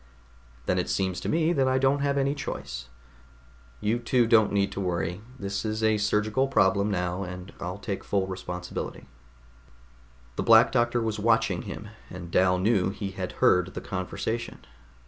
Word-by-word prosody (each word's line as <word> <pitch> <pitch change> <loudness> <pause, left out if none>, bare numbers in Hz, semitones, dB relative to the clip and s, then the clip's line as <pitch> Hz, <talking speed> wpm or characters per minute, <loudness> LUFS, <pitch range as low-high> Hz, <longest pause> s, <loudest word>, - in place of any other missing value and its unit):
"Then 90 - +1
it 90 - -2
seems 95 -2 0
to - - -4
me 165 +1 +2
that 135 -4 +2
I 130 0 +2
don't 135 +2 +3
have 140 0 0
any 140 0 +2
choice. 70 - -6 0.9
You 110 +3 0
two 120 0 +2
don't 110 -2 +4
need 100 -1 +1
to 100 - -4
worry. 90 0 -2 0.2
This 100 -3 -3
is 110 0 -2
a 110 -1 +3
surgical 105 +5 +1
problem 100 -5 +3
now, 90 -1 -1
and 90 0 -7
I'll 90 +2 -4
take 100 -1 -4
full 100 -2 0
responsibility." 90 -1 -6 1.3
The - - 0
Black - - +7
Doctor 120 0 +2
was 110 -1 -2
watching 110 -4 +2
him, 105 - -7 0.2
and 85 -1 -8
Dal 90 0 +4
knew 95 0 +2
he 100 0 -5
had 95 -1 -5
heard 90 +1 +3
the - - -4
conversation. 110 +5 -4
100 Hz, 165 wpm, -27 LUFS, 90-115 Hz, 1.3 s, Black